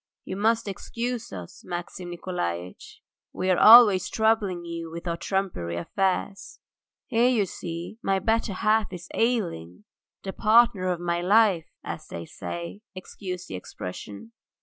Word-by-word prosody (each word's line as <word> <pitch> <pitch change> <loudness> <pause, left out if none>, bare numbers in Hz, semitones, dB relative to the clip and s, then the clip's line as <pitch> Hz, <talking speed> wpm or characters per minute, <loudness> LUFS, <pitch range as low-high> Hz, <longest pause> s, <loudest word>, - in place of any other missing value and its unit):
"You - - -5
must 225 +3 +1
excuse 235 +4 -4
us, 90 -3 -9
Maxim 175 +1 -6
Nikolaitch, 90 - -5 0.3
we 185 - 0
are 180 - +3
always 215 -5 +8
troubling 215 -6 +1
you 170 -1 -5
with 170 +2 -8
our 170 - 0
trumpery 175 - -2
affairs. 195 - -2 0.5
Here 235 +2 +3
you 225 -6 +2
see 170 +4 -7
my 195 -3 +1
better 220 +2 0
half 215 +1 +1
is 180 -2 -8
ailing, 170 - -1 0.4
the 190 - -5
partner 220 -3 +4
of 180 -2 0
my 175 0 -1
life, 195 -3 +4 0.2
as - - -6
they 85 0 -7
say, 85 +3 -7
excuse 185 -1 -7
the - - -9
expression. 95 - -8
185 Hz, 140 wpm, -26 LUFS, 165-215 Hz, 0.5 s, always